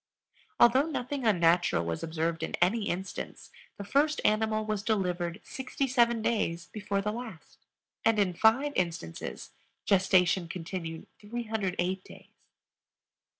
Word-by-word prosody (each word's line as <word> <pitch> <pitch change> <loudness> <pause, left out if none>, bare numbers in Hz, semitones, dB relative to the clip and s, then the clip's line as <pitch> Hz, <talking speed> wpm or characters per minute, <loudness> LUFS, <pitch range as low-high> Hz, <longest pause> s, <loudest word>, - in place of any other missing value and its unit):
Although 260 +5 +6
nothing 270 -4 -2
unnatural 170 - +3
was 85 -1 -3
observed 165 0 -2
in - - -2
any 205 +4 +1
instance, 185 +2 -5 0.3
the 200 - -6
first 285 +9 +2
animal 215 0 +2
was 215 -2 -1
delivered 180 -5 -1
67 245 -3 0
days 175 -8 0
before 200 -2 -2
the 210 - 0
last, 225 -7 -9 0.4
and 225 -1 +3
in 195 -3 +2
5 245 +10 +3
instances 165 - -3 0.3
gestation 185 -2 +3
continued 165 -1 -6
308 205 -5 -2
days. - - -14
200 Hz, 115 wpm, -29 LUFS, 175-230 Hz, 0.4 s, Although